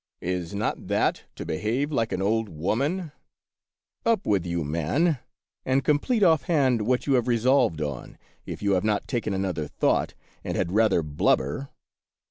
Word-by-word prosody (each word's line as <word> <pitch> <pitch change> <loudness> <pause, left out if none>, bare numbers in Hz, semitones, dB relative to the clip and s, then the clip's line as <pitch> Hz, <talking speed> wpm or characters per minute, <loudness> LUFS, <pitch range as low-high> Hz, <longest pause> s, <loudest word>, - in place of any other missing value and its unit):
" - - -65
Is 90 0 -3
not 105 - -2
that - - 0
to - - -6
behave 115 - -1
like 115 -6 0
an 95 - -1
old 110 +1 +1
woman? 140 - -1 0.9
Up 230 -5 +1
with 95 -4 +1
you, 85 -1 -1
man, 85 - 0 0.4
and 130 +1 +1
complete 175 - +2
offhand 140 - +3
what 125 0 +1
you 140 - +2
have 125 -2 +2
resolved 120 - +2
on, 70 -4 -6 0.3
if - - -7
you 100 - +2
have 95 -2 +2
not 105 -1 0
taken 115 -3 -2
another 95 -6 -2
thought, - - 0 0.3
and - - -3
had 85 - -1
rather 110 -4 +3
blubber 75 - 0
110 Hz, 160 wpm, -26 LUFS, 90-135 Hz, 0.9 s, offhand